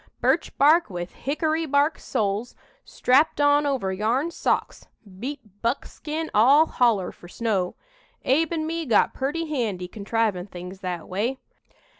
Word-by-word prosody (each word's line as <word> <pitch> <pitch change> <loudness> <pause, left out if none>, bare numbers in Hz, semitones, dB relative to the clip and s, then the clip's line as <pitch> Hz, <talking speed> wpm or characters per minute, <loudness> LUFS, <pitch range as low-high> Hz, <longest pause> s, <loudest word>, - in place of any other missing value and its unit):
Birch - - +1
bark 310 +3 +5
with 175 -1 -5
hickory 315 +3 -1
bark 285 +2 +2
soles, 210 +3 -2 0.3
strapped 285 +5 +2
on 290 0 +4
over 245 -9 -1
yarn 235 - 0
socks, - - -1 0.3
beat 230 -5 -7
buckskin 300 +6 -3
all 270 +9 +6
holler, 230 - +1
fur 175 - -15
snow. 195 -2 -1 0.5
Abe'n 315 +3 +1
me 330 -1 -3
got 225 - +3
purty 290 +5 -2
handy 220 -11 -2
contrivin' 210 -2 -1
things 180 0 -9
that 180 -3 -5
way. 220 +8 -1
245 Hz, 130 wpm, -24 LUFS, 200-295 Hz, 0.5 s, all